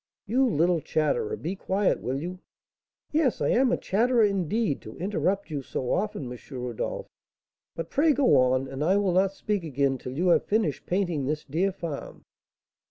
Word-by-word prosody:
"You 255 +5 +2
little 170 -1 +2
chatterer, 430 - 0
be 190 - -4
quiet, 195 +1 0
will 130 +2 -2
you?" 180 +4 -5 0.7
"Yes, 300 -5 +2
I - - +1
am 255 +1 +3
a - - +2
chatterer, 235 +4 +2
indeed, 200 -3 0
to 110 - -10
interrupt 195 0 -1
you 145 -2 -2
so 130 -1 -3
often, 200 -6 -1
M. 125 - -7 0.2
Rodolph; 125 -2 -4 0.7
but 165 0 -5
pray 305 +3 +4
go 275 -2 +4
on, 130 +1 +3
and 135 +2 -4
I 185 +5 +3
will 200 -2 +2
not 190 +1 +3
speak 205 -1 -2
again 140 -3 0
till 125 +2 -7
you 180 +2 +2
have 170 - +4
finished 210 -9 0
painting 175 -7 0
this 150 +1 -2
dear 175 +8 0
farm." 170 -6 -7
180 Hz, 175 wpm, -27 LUFS, 145-210 Hz, 0.7 s, pray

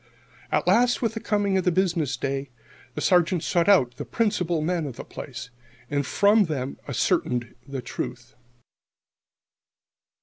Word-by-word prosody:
At - - +1
last, 245 +1 +3
with 225 -2 +1
the 225 - -4
coming 200 -3 +1
of - - -1
the 180 - +3
business 170 -6 0
day, 135 0 -3 0.5
the - - -3
Sergeant 175 -2 +3
sought 175 +2 +2
out 125 -11 +4
the - - -4
principal 180 -7 0
men 170 -2 -1
of 130 - -7
the - - -7
place, 125 -2 -8 0.4
and 145 0 +1
from 205 +1 +4
them 140 -5 -3
ascertained 120 0 0
the 135 -2 -5
truth. 120 0 -6
170 Hz, 145 wpm, -25 LUFS, 135-200 Hz, 0.5 s, out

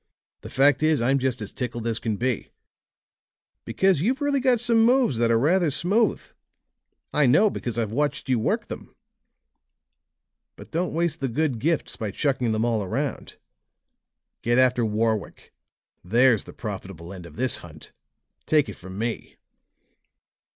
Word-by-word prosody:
The - - -9
fact 140 +3 +3
is, 155 -1 +3
I'm 135 +4 +2
just 125 -3 -1
as 105 - -7
tickled 120 -2 -4
as 115 -1 -1
can 110 -2 -2
be, 125 -1 -2 1.2
because 190 -6 +2
you've 250 +9 +1
really 285 -1 +1
got 255 -2 +3
some 230 -1 +3
moves 240 - +3
that 120 -1 +2
are 115 - +4
rather 165 +7 +2
smooth. 185 - +2 0.9
I 150 -2 +3
know, 205 - +5
because 120 -2 -4
I've 110 -3 -1
watched 145 +5 -1
you 130 -3 +2
work - - 0
them. - - -9 1.6
But - - -13
don't 175 0 -2
waste 170 -1 0
the 135 - -1
good 135 -1 -1
gifts 160 +5 -1
by 110 - -3
chucking 130 +1 0
them 110 +1 0
all 115 -3 0
around. 95 - -4 1.0
Get 120 +1 +1
after 125 -1 +3
Warwick; 110 -1 -2 0.5
there's 115 +4 +3
the - - -11
profitable 95 -5 -7
end 90 -3 -9
of - - -15
this 130 +2 +1
hunt; 80 -2 -12 0.6
take 150 -2 +3
it - - -7
from 95 +1 -10
me!" 115 +2 -4
125 Hz, 155 wpm, -24 LUFS, 110-160 Hz, 1.6 s, know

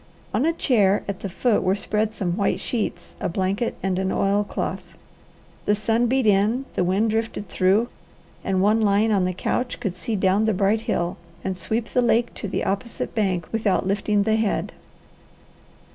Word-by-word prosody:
On 290 - +2
a 330 - +2
chair 210 - +2
at 200 -2 -4
the 200 - -5
foot 225 +4 +1
were 185 +1 +2
spread 215 +2 -1
some 175 -4 -1
white 200 -1 0
sheets, 230 -4 -3
a 195 - -1
blanket, 190 +5 -1
and 190 -1 0
an 190 0 0
oilcloth. 200 +1 -1 0.7
The 205 - +3
sun 225 +3 +1
beat 260 0 +1
in, 210 +6 +3
the - - +1
wind 195 +5 +1
drifted 220 -2 -2
through, 195 +6 +2 0.6
and 190 -1 +1
one 215 +2 +3
lying 210 +1 +3
on 195 -3 +2
the 185 - 0
couch 245 +7 -2
could 200 -7 -3
see 225 +4 -3
down 195 +2 +2
the 220 -2 +1
bright 200 +3 +2
hill, 175 -4 0 0.3
and 190 -1 -2
sweep 220 +6 -2
the 250 - +2
lake 235 0 +2
to 205 - -5
the 195 - -2
opposite 225 +5 -3
bank 190 -6 0
without 215 -5 +1
lifting 205 +1 +1
the 220 +1 +2
head. 220 -2 -1
205 Hz, 180 wpm, -23 LUFS, 190-225 Hz, 0.7 s, The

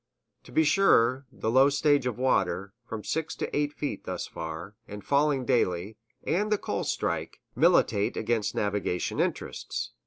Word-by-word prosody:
To - - -13
be 160 - +3
sure, 135 -6 +3
the 110 - -2
low 135 +3 +6
stage 145 -2 +2
of 120 - -3
water, 100 -6 0
from 110 -2 -5
six 160 -1 -2
to - - -4
eight 145 0 +1
feet 145 -1 -5
thus 90 -1 -4
far, 80 +5 -7
and 105 0 -9
falling 140 -2 +2
daily, 105 -5 0 0.3
and 210 +5 0
the 210 - +4
coal - - -3
strike, - - -2 0.2
militate 100 0 +3
against 115 -3 -1
navigation 100 -3 -1
interests. - - -2
125 Hz, 155 wpm, -28 LUFS, 100-145 Hz, 0.3 s, low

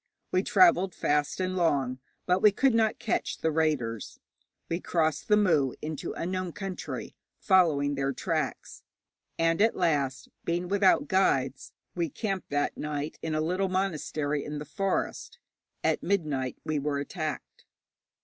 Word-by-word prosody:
We 185 - +3
travelled 185 -1 +4
fast 145 +3 0
and 185 0 -1
long, 140 -7 +1 0.3
but 180 +1 +2
we 210 - +7
could 265 +5 +3
not 220 -1 +2
catch 230 - -1
the 160 - 0
raiders. 145 -9 -1 0.5
We 170 - -2
crossed 160 -3 0
the 210 - +5
Mu 155 -11 +3
into 155 -1 -5
unknown 185 0 -3
country, 195 -3 -6 0.2
following 160 -7 +3
their 140 0 0
tracks, - - -3 0.6
and 165 +3 +2
at 225 +1 +4
last, 135 -5 0 0.2
being 175 +1 -1
without 195 -1 +4
guides, 135 -8 +1 0.2
we 170 -2 -1
camped 195 +3 -3
that 145 0 0
night 150 0 -4
in 160 -1 -2
a 155 - +1
little 185 +4 0
monastery 155 -6 -1
in 150 0 -5
the 150 - -6
forest. 195 - -2 0.5
At - - +1
midnight 150 -10 -1
we 155 -1 -1
were 145 0 -1
attacked. 155 0 -5
160 Hz, 145 wpm, -28 LUFS, 145-185 Hz, 0.6 s, we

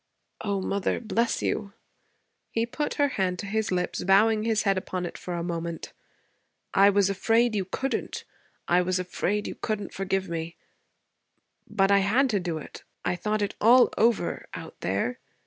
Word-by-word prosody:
'O 200 -2 0
mother, 200 0 0
bless 230 0 0
you!' 200 -2 -2 0.8
He 230 0 0
put 295 +5 -3
her 285 -1 +2
hand 185 -7 -1
to 200 - -5
his 215 +1 -1
lips, 180 -1 -1
bowing 215 +3 +4
his 220 -1 +1
head 195 -2 +3
upon 185 -1 -3
it - - -6
for 180 - -5
a 170 - -2
moment. 170 -1 -4 0.8
'I 200 +1 +6
was 200 -1 +3
afraid 225 +4 +2
you 195 -2 0
couldn't. 270 +8 -3 0.4
I 175 +1 +4
was 185 +1 0
afraid 185 +3 -1
you - - -4
couldn't 210 -3 -4
forgive 195 0 -1
me. 165 0 -4 1.1
But 195 -2 +2
I 200 - +6
had 240 +7 +3
to 205 - +2
do 175 -3 -3
it. 155 - -10 0.2
I 180 - +1
thought 210 +3 -1
it 200 - -2
all 245 +3 +6
over 230 0 +1
out - - -8
there. 100 +7 -1
200 Hz, 170 wpm, -27 LUFS, 180-220 Hz, 1.1 s, I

